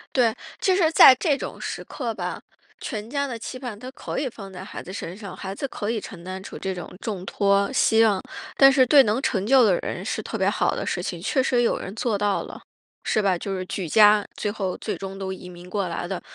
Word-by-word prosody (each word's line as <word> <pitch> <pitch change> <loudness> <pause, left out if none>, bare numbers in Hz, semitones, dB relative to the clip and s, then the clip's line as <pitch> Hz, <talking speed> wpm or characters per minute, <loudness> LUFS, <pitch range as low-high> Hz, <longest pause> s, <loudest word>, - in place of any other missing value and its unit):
对， 240 -4 +4 0.3
其 375 - +3
实 335 -4 +3
在 290 - +10
这 285 +1 +1
种 - - -7
时 - - -4
刻 240 -5 -4
吧， - - -4 0.4
全 215 -4 -5
家 280 +1 -1
的 245 -3 -5
期 255 +3 -7
盼 245 -5 -6
它 255 +2 -8
可 - - -6
以 275 - 0
放 200 -5 -9
在 185 0 -8
孩 195 - -8
子 185 - -9
身 180 -2 -6
上， 200 -2 -9
孩 190 -1 -5
子 275 - -4
可 210 -4 -3
以 225 -2 -2
承 175 -4 -10
担 185 +1 -6
出 - - -9
这 190 - -3
种 180 -2 -8
重 200 -5 -4
托、 200 +2 +2
希 225 -4 +4
望， 205 -4 +3 0.4
但 270 0 +8
是 260 -1 +5
对 275 +2 +8
能 220 +3 0
成 200 -8 0
就 260 +2 +6
的 195 -6 +4
人 - - -5
是 - - -2
特 - - -6
别 - - +2
好 - - 0
的 - - -3
事 - - -2
情， - - -4
确 265 - +1
实 250 -2 +2
有 235 - +2
人 190 - -7
做 225 -1 0
到 205 -1 0
了， - - -10 0.4
是 215 - +1
吧？ 195 -3 +2
就 195 +2 -4
是 185 - -3
举 180 0 -4
家， 210 +3 +6
最 205 - -2
后 195 -4 -3
最 215 - -4
终 195 0 -7
都 190 -1 -4
移 185 -1 -8
民 180 0 -11
过 195 -1 -1
来 175 0 -4
的。 190 0 -4
210 Hz, 270 characters per minute, -24 LUFS, 190-250 Hz, 0.4 s, 在